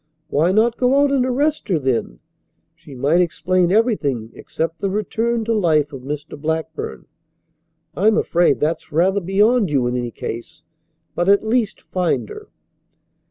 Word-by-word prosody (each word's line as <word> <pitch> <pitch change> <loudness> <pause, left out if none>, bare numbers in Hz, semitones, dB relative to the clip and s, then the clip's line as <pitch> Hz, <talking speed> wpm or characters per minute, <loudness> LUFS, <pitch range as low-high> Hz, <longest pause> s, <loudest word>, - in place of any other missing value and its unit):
Why 160 +5 +2
not 230 +4 +2
go 260 +2 +3
out 285 0 +3
and 270 -2 +2
arrest 290 +2 0
her 180 - +2
then? 125 - -2 0.5
She 140 - -14
might 145 +7 +2
explain 180 +1 +1
everything 145 - 0
except 165 +1 -4
the 195 - -1
return 225 +3 -1
to 230 - 0
life 155 -8 +1
of 135 - -7
Mr. 145 +2 -7
Blackburn. 160 0 -4 0.9
I'm 215 +3 +3
afraid 175 -4 +2
that's 160 +2 -2
rather 190 +6 +2
beyond 205 +3 +2
you 135 -4 +1
in 120 +1 -1
any 120 -1 -2
case. 120 +7 -7 0.5
But 175 +2 0
at 200 +1 +4
least 220 -1 0
find 180 -3 -1
her." 425 0 -10
180 Hz, 155 wpm, -20 LUFS, 150-220 Hz, 0.9 s, at